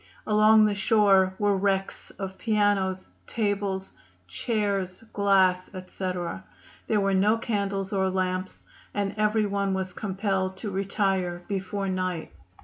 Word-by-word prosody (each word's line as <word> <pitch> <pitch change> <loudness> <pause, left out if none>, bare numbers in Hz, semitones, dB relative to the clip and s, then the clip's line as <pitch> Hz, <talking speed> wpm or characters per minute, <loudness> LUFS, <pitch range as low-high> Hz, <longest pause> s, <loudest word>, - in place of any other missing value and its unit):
Along 215 0 +5
the 210 - +2
shore 195 -2 +3
were 205 -1 +2
wrecks 195 0 -1
of 190 -1 -6
pianos, 205 -4 +1 0.2
tables, 200 -3 -2 0.3
chairs, 200 - -2
glass, 190 -3 +3
etc. 185 - -4 0.4
There 215 - +2
were 195 0 +1
no 205 +4 +3
candles 200 -3 -2
or 190 -1 +1
lamps, 185 0 -2 0.3
and 200 -1 -1
every 215 0 +2
one 200 -1 0
was 190 -1 -3
compelled 190 -2 -2
to 205 +1 -5
retire 190 -2 -1
before 195 0 -3
night." 185 -3 -2
195 Hz, 125 wpm, -26 LUFS, 185-205 Hz, 0.4 s, Along